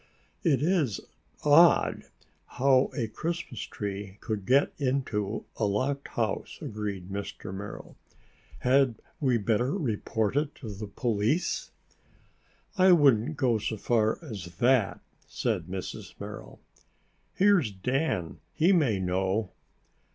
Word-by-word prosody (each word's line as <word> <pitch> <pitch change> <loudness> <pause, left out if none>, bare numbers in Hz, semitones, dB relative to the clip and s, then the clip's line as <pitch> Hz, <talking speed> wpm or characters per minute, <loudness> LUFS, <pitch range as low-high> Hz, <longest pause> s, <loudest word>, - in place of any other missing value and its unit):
"It 145 -6 +2
is 160 - +1 0.4
odd 160 +4 +5 0.5
how 130 0 +4
a 120 -6 0
Christmas 165 +3 -4
tree 100 -1 -5
could 105 -4 -4
get 135 +3 +4
into 125 -6 -1
a 110 - +1
locked 130 +8 -1
house," 110 -4 -2
agreed 100 -4 -5
Mr. 100 -1 -5
Merrill. 100 +2 -8 0.7
"Had 130 -1 +3 0.2
we 130 -5 +2
better 115 +5 +1
report 110 - -1
it 150 0 0
to 110 -6 -7
the 105 +2 -6
police?" 115 - 0 1.1
"I 185 0 +7
wouldn't 140 -3 +4
go 125 -6 +2
so 110 +1 -3
far 110 0 +1
as 95 - -8
that," 120 -4 +2 0.3
said 85 - -1
Mrs. 95 0 -7
Merrill. - - -8 0.8
"Here's 195 - +4
Dan. 100 - -2 0.2
He 170 +5 +4
may 135 - +2
know." 95 +3 0
115 Hz, 115 wpm, -28 LUFS, 100-140 Hz, 1.1 s, I